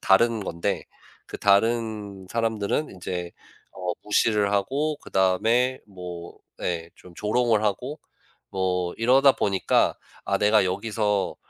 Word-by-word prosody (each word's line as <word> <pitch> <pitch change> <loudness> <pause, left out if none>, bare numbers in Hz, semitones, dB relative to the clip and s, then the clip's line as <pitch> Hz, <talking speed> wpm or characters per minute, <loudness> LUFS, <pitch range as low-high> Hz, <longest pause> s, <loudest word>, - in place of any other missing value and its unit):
다른 110 +2 +3
건데. 85 -3 -2 0.4
그 - - -8
다른 105 -2 +1
사람들은 115 +5 -1
인제 90 -1 -5 0.4
어 90 -1 -3
무시를 105 -1 +2
하고 145 +9 0
그다음에 115 +6 +1
뭐 90 -3 -9 0.3
예. 85 -1 -2
좀 90 -2 -16
조롱을 110 +1 +1
하고 125 +9 -2 0.5
뭐 90 -2 -1
이러다 130 +4 +5
보니까 95 -2 +1 0.3
'아 - - +1
내가 105 -1 +4
여기서 105 0 -1
105 Hz, 230 characters per minute, -25 LUFS, 95-115 Hz, 0.5 s, 이러다